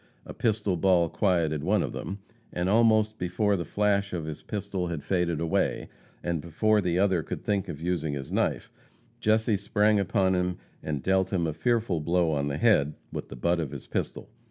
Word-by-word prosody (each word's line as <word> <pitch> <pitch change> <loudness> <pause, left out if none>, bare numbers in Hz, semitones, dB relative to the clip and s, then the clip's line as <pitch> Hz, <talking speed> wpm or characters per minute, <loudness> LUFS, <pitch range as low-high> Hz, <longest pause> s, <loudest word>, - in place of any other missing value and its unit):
A - - -8
pistol 105 -5 0
ball 85 -2 +3
quieted 85 -7 +1
one - - +2
of - - -3
them, 100 - -5 0.3
and 90 +1 -1
almost 110 0 +3
before 100 +3 +1
the 85 - -2
flash 100 -1 +1
of 85 -3 -3
his 80 -1 -6
pistol 100 -3 -3
had 85 -4 -4
faded 90 -4 0
away, 80 -1 0 0.3
and 85 -3 -1
before 105 +7 +2
the 90 -2 0
other 95 -3 +3
could - - -6
think 100 -2 -1
of 70 - -6
using 80 -3 -1
his 70 -2 -6
knife, - - -1 0.5
Jesse 110 0 +2
sprang 105 +1 +2
upon 95 0 +2
him 90 0 0 0.2
and 75 -3 -3
dealt 95 0 +2
him 90 -4 +1
a 80 - -1
fearful 105 +1 0
blow 85 +1 +2
on 70 -2 0
the 70 0 -2
head 75 -11 +3 0.2
with - - -5
the - - -8
butt 85 +7 +1
of 80 -4 -2
his - - -8
pistol. - - -4
90 Hz, 195 wpm, -27 LUFS, 80-105 Hz, 0.5 s, ball